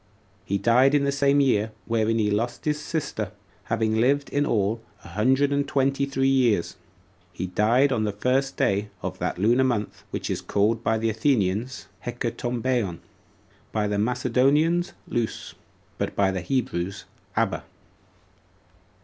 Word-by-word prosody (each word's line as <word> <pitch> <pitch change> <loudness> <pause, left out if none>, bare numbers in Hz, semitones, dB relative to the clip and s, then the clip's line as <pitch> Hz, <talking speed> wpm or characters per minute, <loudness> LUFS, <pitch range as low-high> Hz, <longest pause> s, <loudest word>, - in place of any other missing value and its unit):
He 100 - 0
died 125 +7 +4
in 145 - +3
the 140 - +1
same 140 0 +3
year 110 -6 +2
wherein 115 0 +1
he 105 -2 +1
lost 115 +4 -2
his 150 -1 0
sister, 140 - -3 0.3
having 110 -1 0
lived 140 +3 +2
in 145 +1 0
all 110 +1 0 0.2
a - - -11
hundred 130 +9 +2 0.2
twenty 135 0 +1
and 140 - -11
three 135 0 +1
years. 125 -9 +2 0.6
He 90 - -4
died 115 +9 +3
on 110 -4 +1
the 105 - 0
first 130 +6 0
day 100 +1 +1
of - - -4
that - - -2
lunar 115 +7 +3
month 120 -5 -2
which - - -4
is - - -2
called 110 +3 +1
by 110 - +2
the 115 0 0
Athenians 110 0 0 0.2
Hecatombaeon, 120 -6 -2 0.7
by 105 -1 0
the 105 0 -1
Macedonians 140 - +2
Lous, 120 -2 -3 0.5
but - - -2
by 95 -1 +3
the 95 -1 -3
Hebrews 100 -6 -2 0.3
Abba. - - 0
115 Hz, 150 wpm, -25 LUFS, 105-135 Hz, 0.7 s, died